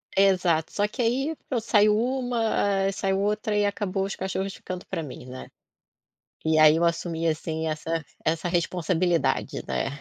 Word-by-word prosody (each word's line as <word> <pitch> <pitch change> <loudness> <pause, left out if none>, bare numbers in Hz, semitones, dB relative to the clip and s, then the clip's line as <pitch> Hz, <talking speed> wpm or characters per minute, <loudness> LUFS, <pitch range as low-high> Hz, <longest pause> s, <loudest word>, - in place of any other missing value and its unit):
Exato, 185 -5 +3
só 205 0 +1
que 230 +5 -5
aí 265 +7 0 0.3
saiu 210 -1 +4
uma, 230 -5 0
ah, - - +1
saiu 195 -1 -1
outra 210 +1 0
e 205 - +3
acabou 200 -1 -1
os 195 - -4
cachorros 190 +1 -3
ficando 180 +1 -7
pra - - -4
mim, 135 -5 -8
né. 130 0 -9 1.0
E 160 0 +3
aí 155 0 +7
eu 170 - +2
assumi, 165 -1 -1
assim, 160 0 -1
essa 160 +1 -3 0.2
essa 165 +2 0
responsabilidade, 175 0 0
né, - - -1
190 Hz, 155 wpm, -26 LUFS, 165-205 Hz, 1.0 s, aí